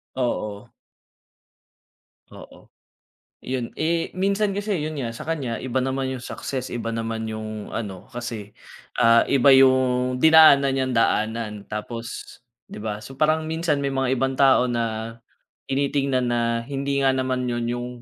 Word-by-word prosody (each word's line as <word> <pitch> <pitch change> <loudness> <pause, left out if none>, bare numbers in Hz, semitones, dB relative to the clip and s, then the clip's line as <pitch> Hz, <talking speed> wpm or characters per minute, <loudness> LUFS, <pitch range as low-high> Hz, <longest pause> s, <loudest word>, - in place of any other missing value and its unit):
Oo. 105 -5 -3 1.6
Oo. - - -15 0.7
Yun 125 -2 -4
eh, 165 +1 -1
minsan 200 +2 0
kasi 200 -5 -2
yun 155 - -3
nga 115 -2 -4
sa - - -8
kanya 140 -8 -2
iba 130 0 -1
naman 130 0 -2
yung 130 - -5
success 130 +1 -5
iba 115 -1 -4
naman 115 0 -3
yung 110 -1 -6
ano 100 -5 -5
kasi, 115 -4 -6 0.5
ah, 115 0 +6
iba 140 0 +3
yung 130 -1 +4
dinaanan 160 -3 +7
niyang 130 -1 0
daanan. 110 -2 0
Tapos, 115 +2 -7 0.3
di - - -10
ba. 105 0 -4
So, 130 +5 -11
parang 155 +2 +1
minsan 160 -2 0
may 140 - -1
mga 135 -1 0
ibang 135 +1 0
tao 130 -2 +4
na, 115 -1 -3 0.5
tinitingnan 135 -1 0
na 120 - +1 0.2
hindi 140 +2 -2
nga 135 - +4
naman 130 -1 -1
yun 120 -1 -2
yung 120 +1 -3
130 Hz, 145 wpm, -23 LUFS, 115-140 Hz, 1.6 s, dinaanan